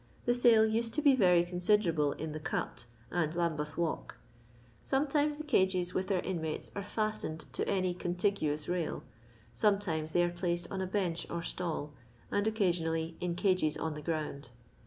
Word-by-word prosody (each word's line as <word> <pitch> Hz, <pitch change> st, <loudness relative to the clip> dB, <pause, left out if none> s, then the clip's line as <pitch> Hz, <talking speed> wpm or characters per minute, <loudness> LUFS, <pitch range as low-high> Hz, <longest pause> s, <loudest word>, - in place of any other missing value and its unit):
The 240 Hz, -, +4 dB
sale 235 Hz, -3 st, +6 dB
used 225 Hz, +1 st, 0 dB
to 300 Hz, -, +1 dB
be 280 Hz, -3 st, +7 dB
very 180 Hz, -7 st, +5 dB
considerable 175 Hz, -4 st, +2 dB
in 160 Hz, 0 st, -5 dB
the 155 Hz, -, -5 dB
Cut" 150 Hz, -, -3 dB, 0.3 s
and 165 Hz, -2 st, 0 dB
Lambeth 160 Hz, -3 st, -1 dB
walk. 170 Hz, -2 st, -2 dB, 0.7 s
Sometimea 290 Hz, +2 st, +1 dB
the 305 Hz, -, -5 dB
cages 185 Hz, -10 st, +2 dB
with 185 Hz, 0 st, -1 dB
their 190 Hz, -3 st, 0 dB
inmates'are 170 Hz, +2 st, -3 dB
fostened 215 Hz, -6 st, -2 dB
to -, -, -2 dB
any 185 Hz, -2 st, +1 dB
contiguous 175 Hz, -4 st, -1 dB
rail; 175 Hz, -2 st, -2 dB, 0.5 s
some 210 Hz, -2 st, +3 dB
times 160 Hz, -6 st, -2 dB
they 175 Hz, -, +4 dB
are 175 Hz, -, +2 dB
placed 175 Hz, -1 st, -2 dB
on 190 Hz, -1 st, -2 dB
a 190 Hz, -, -1 dB
bench 180 Hz, -4 st, -1 dB
or 170 Hz, -1 st, -3 dB
stall; 160 Hz, -4 st, -3 dB, 0.4 s
and 205 Hz, +1 st, +1 dB
occasionally 165 Hz, -6 st, 0 dB
in 175 Hz, -1 st, -1 dB
cages 180 Hz, -5 st, +2 dB
on 160 Hz, -1 st, -2 dB
the 150 Hz, -, -7 dB
ground. 150 Hz, -4 st, -3 dB
175 Hz, 165 wpm, -32 LUFS, 160-205 Hz, 0.7 s, be